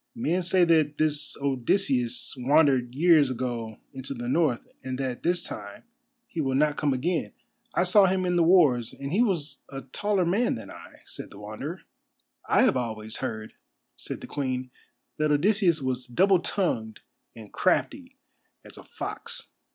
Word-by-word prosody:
"Men 185 -6 0
say 180 +1 +3
that 155 -3 +2
this 150 -1 0
Odysseus 130 -2 0
wandered 130 -2 +3
years 155 -2 +5
ago 120 -3 -4 0.2
into 135 +1 -6
the 120 0 -5
North, 140 -3 +1 0.2
and 130 0 -4
that 130 -2 -3
this 175 +1 0
time 100 -1 -8 0.4
he 170 -8 -4
will 135 -2 0
not 150 +1 +2
come 145 -1 0
again. 160 +6 -1 0.4
I - - +3
saw 190 +2 +5
him 185 0 0
in 180 0 +1
the 175 - +3
wars, 150 -10 +4
and 140 +2 -6
he 210 - +3
was 175 -10 -1
a 135 -1 -6
taller 195 +7 -1
man 205 +8 +1
than - - -9
I," - - -13
said - - -9
the - - -13
Wanderer. - - -7 0.7
"I - - +5
have 200 - +3
always 110 -3 -4
heard," 110 -5 -5 0.4
said - - -6
the - - -7
Queen, 130 -3 -3 0.5
"that 155 -1 +1
Odysseus 175 -1 +2
was 130 -1 -2
double 185 +9 +3
tongued 115 - -2 0.3
and 110 -3 -12
crafty - - 0 0.5
as - - -12
a - - -12
fox. - - -7
145 Hz, 165 wpm, -26 LUFS, 125-175 Hz, 0.7 s, years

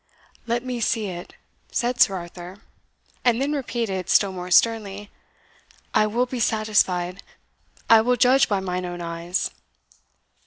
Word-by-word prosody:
"Let 235 +2 -1
me 250 -1 -3
see 215 -2 0
it," 175 -1 -8 0.4
said 245 0 -1
Sir 195 - +5
Arthur; 175 +2 -9 0.6
and 240 -2 +3
then 275 +2 0
repeated, 230 - -3
still 200 -2 +4
more 180 -1 -7
sternly, 205 0 +2 0.8
"I 215 - +3
will 235 +4 0
be 255 0 -5
satisfied 200 -5 +1 0.7
I 225 -1 +7
will 250 +2 +2
judge 255 +2 +4
by 200 -2 0
mine 180 -1 -3
own 175 0 -6
eyes." 170 +1 -3
210 Hz, 140 wpm, -23 LUFS, 180-240 Hz, 0.8 s, I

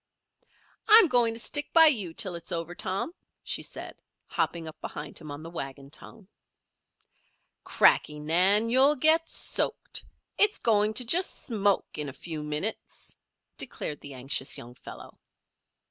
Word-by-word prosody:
"I'm 440 -2 +8
going 235 -3 +2
to - - -6
stick 290 +5 -2
by 330 -1 +8
you 215 - +3
till 200 -6 -1
it's 170 +2 -6
over, 170 0 -3
Tom," 195 - -3 0.3
she - - 0
said, - - -8 0.2
hopping 165 -2 -3
up 155 - -10
behind - - -7
him 155 -2 -11
on 145 +2 -8
the 165 - -10
wagon 140 -3 -8
tongue. 200 +4 -5 1.4
"Cracky, 150 - +2
Nan! 185 +9 +4
You'll 270 +4 +5
get 320 +4 +3
soaked. - - -2 0.4
It's 415 0 +4
going 215 -1 +1
to 250 - +4
just 355 +10 +1
smoke 205 -8 -1
in 150 -1 -3
a - - -10
few 160 +1 -7
minutes," 150 +8 -4 0.4
declared 150 - -4
the 140 -2 -9
anxious 130 +1 0
young 120 +1 -11
fellow. 125 - -13
190 Hz, 145 wpm, -27 LUFS, 150-245 Hz, 1.4 s, I'm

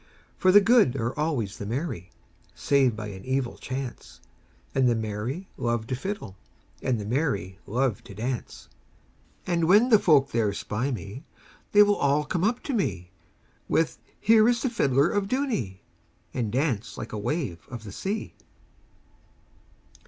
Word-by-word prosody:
For 185 - +4
the 205 +2 +8
good 220 - +4
are 120 -1 -2
always 135 -10 -2
the 100 - -4
merry, 115 - -3 0.5
Save 135 -5 +2
by 105 -1 -5
an 95 -2 -9
evil 130 0 -1
chance, 130 -1 -6 0.5
And 130 -2 +3
the 120 - +2
merry 110 - -4
love 120 -2 -1
the 130 - -2
fiddle, 130 - -5 0.4
And 125 -4 0
the 105 - -5
merry 120 - -1
love 120 -1 0
to 100 - -11
dance. 120 +3 -4 0.8
And 170 -2 +1
when 210 +8 +5
the 215 -4 +7
folk 140 -7 +4
there 110 -3 +1
spy 105 +6 -2
me, 120 +1 -6 0.5
They 210 0 +8
all 150 -8 +2
come 170 +3 -1
up 235 +4 +1
to 280 - -3
me, 95 - -2 0.6
With, 160 - +1 0.2
"Here 220 +1 +5
is 240 -1 +1
the 260 - 0
fiddler 140 - +3
of 205 -1 0
Dooney 215 - -2 0.3
!" - - -39
And 115 -5 -2
dance 125 -4 -1
like - - -6
a 105 - -3
wave 110 - -2
of 120 -3 -7
the 105 - -8
sea. 200 - -4
130 Hz, 160 wpm, -26 LUFS, 110-175 Hz, 0.8 s, the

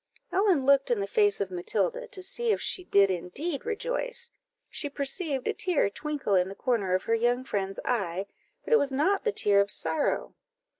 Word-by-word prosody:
Ellen 375 -8 +2
looked 275 0 +4
in 240 -3 +1
the 200 - -1
face 205 0 +2
of 195 -2 -2
Matilda, 480 - -1
to 385 -4 -5
see 470 +5 -2
if - - +1
she 370 - 0
did 200 - +4
indeed 270 - -4
rejoice; 485 +1 -3 0.4
she 290 - -3
perceived 280 0 -2
a - - +1
tear 350 - +1
twinkle 295 -5 -3
in 185 -1 +3
the 195 - -8
corner 205 -8 0
of 185 - -1
her 230 - 0
young 240 +2 +1
friend's 195 -5 -3
eye, 195 -5 -1 0.4
but - - -1
it 460 - +7
was 280 - 0
not 315 +9 +1
the 445 - +2
tear 200 - +4
of 200 - -1
sorrow. 295 +7 0
270 Hz, 195 wpm, -28 LUFS, -, 0.4 s, it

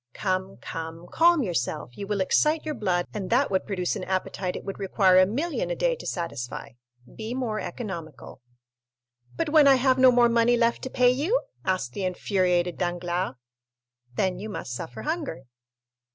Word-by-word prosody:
"Come, 190 -1 -2
come, 165 +1 -7
calm 335 -3 +4
yourself. 150 - -3
You 200 - -6
will 205 -1 -1
excite 305 +12 +2
your 310 - -2
blood, 185 -8 0
and 200 -3 -4
that 255 +2 +2
would 190 - 0
produce 180 -3 -1
an - - -5
appetite 185 0 -2
it - - -6
would 195 - -6
require 190 -1 +4
a 185 - +5
million 340 - -2
a - - -1
day - - +1
to - - -8
satisfy. 140 -7 -4 0.5
Be 225 +2 -5
more 230 -5 -2
economical." 165 - -7 0.9
"But 330 -2 -1
when 300 -2 +6
I 275 - +8
have 260 0 +2
no 255 0 +8
more 240 -1 +5
money 235 +1 +3
left 235 0 +2
to - - -3
pay 250 -1 +4
you?" 330 - +1 0.2
asked 185 -10 -1
the 200 - -4
infuriated 180 -2 0
Danglars. 175 -3 -2 0.8
"Then 185 +2 0
you 215 +3 -6
must 130 -10 -5
suffer 125 0 -6
hunger." 310 - -3
200 Hz, 175 wpm, -26 LUFS, 180-255 Hz, 0.9 s, I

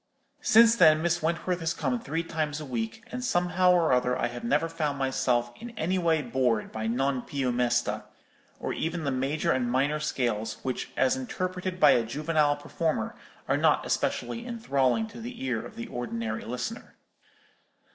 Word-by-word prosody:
"Since 230 +1 +6
then 155 -4 +6
Miss 170 0 +1
Wentworth 170 +2 -1
has 165 0 -1
come 130 -6 -1
three 160 +6 -3
times 155 -2 -2
a 155 - -6
week; 120 - -4
and 250 0 -4
somehow 180 -4 +3
or 170 -5 +4
other 125 0 +2
I 120 - 0
have 120 0 -8
never 145 +7 +2
found 150 -3 -2
myself 125 -3 +1
in 240 - -8
any 185 -1 0
way 165 -3 +2
bored 125 -5 0
by 110 0 -3
'Non 130 +2 0
più 130 -1 -2
mesta,' 120 0 0 0.5
or - - -3
even 165 +1 -2
the 140 - 0
major 135 +4 0
and 125 -2 0
minor 140 +4 +1
scales, 120 -7 -1
which, 130 -1 -3
as 255 - +3
interpreted 185 -7 -3
by 150 - +7
a 120 - +4
juvenile 150 +4 +1
performer, 155 +2 -2 0.3
are - - +2
not - - +3
especially 235 - -1
enthralling 220 - +1
to 225 +1 -10
the 240 - -7
ear 120 -4 -1
of - - -10
the 115 - -5
ordinary 115 -2 -4
listener. 125 - -5
150 Hz, 175 wpm, -28 LUFS, 125-175 Hz, 0.5 s, by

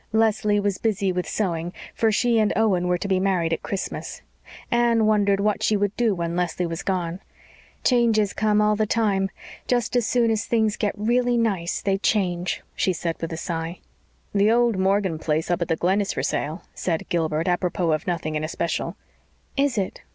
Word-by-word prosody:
Leslie 215 -2 +2
was 200 -2 -1
busy 200 -3 0
with 180 0 -3
sewing, 175 -4 -1 0.2
for 225 -1 +2
she 235 +1 +2
and 215 -1 +3
Owen 190 -5 +2
were 180 0 +2
to 200 - -4
be 190 -1 +2
married 180 -4 +1
at - - -2
Christmas. 195 - -5 0.5
Anne 235 -2 +3
wondered 205 -2 +3
what 210 0 +1
she 215 - +2
would 205 0 -1
do 230 -4 +2
when 170 -1 -2
Leslie 180 0 -1
was 165 0 -4
gone. 180 -2 -2 0.6
"Changes 225 -5 +3
come 210 -1 +2
all 210 0 +3
the 215 0 0
time. 200 -4 +1 0.4
Just 245 -1 0
as 240 -3 +2
soon 235 -2 +2
as 215 -2 0
things 220 -2 +1
get 210 0 -2
really 240 +3 +2
nice 195 -7 0
they 195 -1 +1
change," 185 -4 0
she 185 - +1
said 165 -1 -2
with 165 - -3
a 160 - -4
sigh. 165 +1 -4 0.6
"The 205 +1 +4
old 235 -1 +3
Morgan 190 -3 +1
place 155 +2 -1
up 175 - 0
at 170 - 0
the 165 - +1
Glen 185 +5 +1
is 200 - -2
for - - -3
sale," 155 +5 -2
said 165 -3 -2
Gilbert, 160 -1 0
apropos 175 -1 0
of 155 - -1
nothing 170 -3 -2
in 155 0 -2
especial. 165 +2 -2 0.6
"Is 275 -4 +1
it?" 195 -2 -2
195 Hz, 195 wpm, -24 LUFS, 175-215 Hz, 0.6 s, The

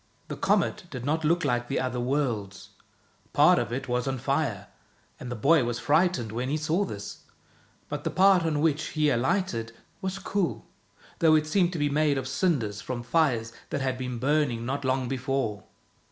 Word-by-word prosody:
The - - -4
comet - - +1
did 125 -1 -6
not 160 +3 0
look 170 +1 +2
like 120 -2 0
the 135 - -1
other 125 -1 -2
worlds. 120 -7 -2 0.6
Part - - +6
of 105 - -3
it 135 +3 -3
was 125 +1 -1
on 135 0 -1
fire, 130 -5 -1 0.5
and 125 - -7
the - - -2
boy 140 +6 +4
was 120 0 -2
frightened 145 - +1
when 125 +3 -3
he 150 - 0
saw 160 +6 0
this; 100 - -7 0.7
but - - -5
the - - -1
part 190 -1 +5
on 155 -3 0
which 155 0 +2
he 150 -2 +2
alighted 120 - 0 0.3
was 190 -1 -3
cool, 195 -1 -2 0.5
though 160 -1 +5
it 155 0 +2
seemed 175 +3 +2
to - - -3
be 145 -1 +1
made 145 0 +2
of 130 -1 -3
cinders 130 - 0
from 120 -2 -5
fires 120 -5 +1 0.2
that 140 - -2
had 130 -1 -1
been 125 -1 -4
burning 130 -3 +1
not 140 +3 -2
long 130 -1 0
before. 130 -5 -2
135 Hz, 185 wpm, -27 LUFS, 120-155 Hz, 0.7 s, Part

